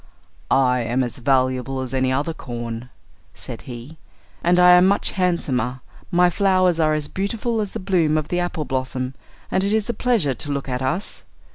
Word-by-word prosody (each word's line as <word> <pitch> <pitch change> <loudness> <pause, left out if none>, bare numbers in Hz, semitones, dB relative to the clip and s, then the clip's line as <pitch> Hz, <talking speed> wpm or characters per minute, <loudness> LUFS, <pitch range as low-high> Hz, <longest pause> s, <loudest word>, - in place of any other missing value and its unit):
"I 125 -2 +3
am 120 +3 0
as 120 - -4
valuable 130 0 +1
as 130 0 -4
any 130 0 +1
other 145 +5 0
corn," 120 -3 -6 0.5
said - - -7
he, 125 +6 -9 0.4
"and 175 +1 +3
I 180 0 +7
am 180 +1 +7
much 200 - +1
handsomer; 135 -9 -1 0.3
my 175 0 +4
flowers 185 -2 +2
are 155 -1 +3
as 150 -1 -3
beautiful 220 +3 -2
as 205 - -4
the - - -4
bloom 175 -5 +2
of 155 -1 -2
the 175 - 0
apple 175 -3 -2
blossom, 130 -1 -3 0.4
and 190 - +1
it 200 - 0
is 220 +1 +1
a - - +1
pleasure 215 - +1
to 145 +4 -5
look 140 -1 -3
at 125 -1 -2
us. 135 +10 -3
150 Hz, 185 wpm, -22 LUFS, 130-180 Hz, 0.5 s, I